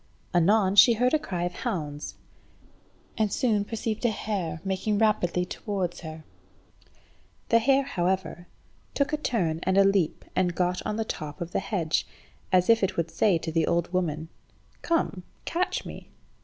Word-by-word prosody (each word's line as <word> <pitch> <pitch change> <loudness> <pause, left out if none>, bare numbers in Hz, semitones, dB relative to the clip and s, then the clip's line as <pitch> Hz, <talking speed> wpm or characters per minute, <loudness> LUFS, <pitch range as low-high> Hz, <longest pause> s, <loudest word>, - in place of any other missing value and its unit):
Anon 190 +3 +3
she 205 +4 +8
heard 250 +4 +1
a 310 - +4
cry 180 -10 -3
of 175 0 -2
hounds, 150 -4 -4 1.0
and 215 -2 +2
soon 220 -5 +1
perceived 225 +1 -4
a 240 - +4
hare 195 -7 -3
making 195 +2 0
rapidly 180 -5 +2
towards 185 -2 -3
her. 160 -1 -8 1.3
The 230 - +5
hare, 270 +4 +3
however, 185 -4 -2 0.5
took 285 +1 0
a - - +2
turn 180 - -1
and 190 +1 +1
a 195 - +7
leap 195 -5 +1
and 180 -2 +1
got 180 0 0
on 210 - -1
the 225 0 -1
top 150 -4 -6
of 170 -1 -5
the - - 0
hedge, 185 -5 -1 0.4
as 180 -1 +4
if 230 -1 +5
it 195 - 0
would 170 -1 -1
say 200 -5 +3
to 165 0 -5
the 160 -1 +1
old 170 +1 0
woman 160 -3 -1 0.5
"Come, 330 - 0 0.2
catch 355 +2 -1
me." - - -9
190 Hz, 165 wpm, -27 LUFS, 175-220 Hz, 1.3 s, she